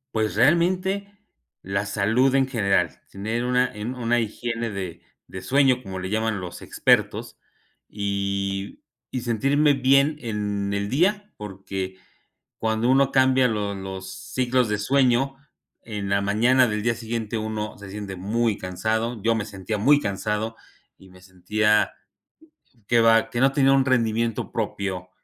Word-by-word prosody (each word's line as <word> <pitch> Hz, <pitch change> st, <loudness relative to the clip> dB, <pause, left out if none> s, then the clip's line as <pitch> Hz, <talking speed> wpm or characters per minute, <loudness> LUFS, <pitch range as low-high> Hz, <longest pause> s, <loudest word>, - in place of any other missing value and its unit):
Pues, 110 Hz, -2 st, 0 dB
realmente, 185 Hz, -, +2 dB, 0.5 s
la 100 Hz, +1 st, -2 dB
salud 110 Hz, +7 st, +2 dB
en 135 Hz, -1 st, +4 dB
general, 110 Hz, -7 st, 0 dB
tener 110 Hz, +5 st, -3 dB
una 125 Hz, 0 st, +1 dB
en 110 Hz, +5 st, -5 dB
una 120 Hz, 0 st, +1 dB
higiene 115 Hz, +1 st, -3 dB
de 95 Hz, -5 st, -6 dB, 0.3 s
de 95 Hz, -, -8 dB
sueño, 130 Hz, +3 st, +3 dB
como 95 Hz, -4 st, -6 dB
le 95 Hz, +1 st, -5 dB
llaman 110 Hz, -2 st, -1 dB
los 90 Hz, -1 st, -8 dB
expertos -, -, +1 dB, 0.5 s
y 100 Hz, -1 st, -3 dB, 0.3 s
y 130 Hz, -, -4 dB
sentirme 140 Hz, +6 st, +2 dB
bien 140 Hz, +3 st, +3 dB
en 105 Hz, -4 st, -3 dB
el 100 Hz, 0 st, -2 dB
día, 205 Hz, +8 st, +1 dB
porque 95 Hz, -2 st, -6 dB, 0.6 s
cuando 110 Hz, +2 st, 0 dB
uno 135 Hz, +1 st, +4 dB
cambia 130 Hz, -1 st, +4 dB
los 105 Hz, -2 st, -2 dB
los 95 Hz, 0 st, -7 dB, 0.2 s
ciclos 125 Hz, -2 st, +1 dB
de 105 Hz, -, -1 dB
sueño 130 Hz, +3 st, +2 dB, 0.5 s
en 105 Hz, -3 st, -5 dB
la 100 Hz, 0 st, +2 dB
mañana 120 Hz, +5 st, +3 dB
del 105 Hz, 0 st, -2 dB
día 120 Hz, -, +2 dB
siguiente 115 Hz, -1 st, -4 dB
uno 110 Hz, 0 st, -4 dB
se 100 Hz, -1 st, -11 dB
siente 100 Hz, -1 st, -6 dB
muy 105 Hz, +3 st, 0 dB
cansado, 110 Hz, +5 st, -2 dB
yo 115 Hz, 0 st, +3 dB
me 110 Hz, -, -1 dB
sentía 105 Hz, +1 st, -5 dB
muy 140 Hz, +8 st, +5 dB
cansado 105 Hz, +1 st, -2 dB, 0.4 s
y 95 Hz, -, -18 dB
me 90 Hz, 0 st, -17 dB
sentía, 105 Hz, +4 st, +1 dB, 1.0 s
que 120 Hz, -1 st, +4 dB
va, 115 Hz, 0 st, +4 dB
que 120 Hz, +2 st, -2 dB
no 135 Hz, 0 st, +5 dB
tenía 135 Hz, -1 st, +4 dB
un 135 Hz, -1 st, +4 dB
rendimiento 115 Hz, -3 st, 0 dB
propio, 95 Hz, -2 st, -3 dB
110 Hz, 145 wpm, -24 LUFS, 100-125 Hz, 1.0 s, muy